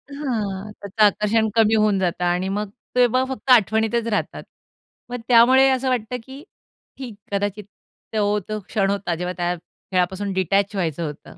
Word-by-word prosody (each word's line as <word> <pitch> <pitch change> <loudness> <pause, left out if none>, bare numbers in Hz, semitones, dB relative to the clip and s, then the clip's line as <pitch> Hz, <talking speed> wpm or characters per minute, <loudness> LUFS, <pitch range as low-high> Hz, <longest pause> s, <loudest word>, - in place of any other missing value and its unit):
हां. 210 -8 -3
तर 200 - -6
ते 215 +3 +2
आकर्षण 210 +2 +2
कमी 225 -1 +4
होऊन 210 -2 +2
जातं 180 -1 -1
आणि 180 +2 0
मग 205 +1 -3 0.3
तेव्हा 250 +1 +3
फक्त 260 0 -7
आठवणीतच 225 0 +3
राहतात. 215 - -2 0.7
मग 245 - -4
त्यामुळे 255 +3 +6
असं 260 0 0
वाटतं 250 0 -1
की, 270 +4 -11 0.5
ठीक 250 -5 -8 0.2
कदाचित 205 +1 -2 0.5
तो, 210 -1 +1
तो 215 +2 -5
क्षण 195 0 -1
होता 195 -3 -1
जेव्हा 180 +2 -4
त्या 175 0 -1 0.4
खेळापासून 190 +2 0
डिटॅच 195 +2 0
व्हायचं 170 -4 -2
होतं. 150 -1 -9
210 Hz, 160 wpm, -22 LUFS, 190-230 Hz, 0.7 s, त्यामुळे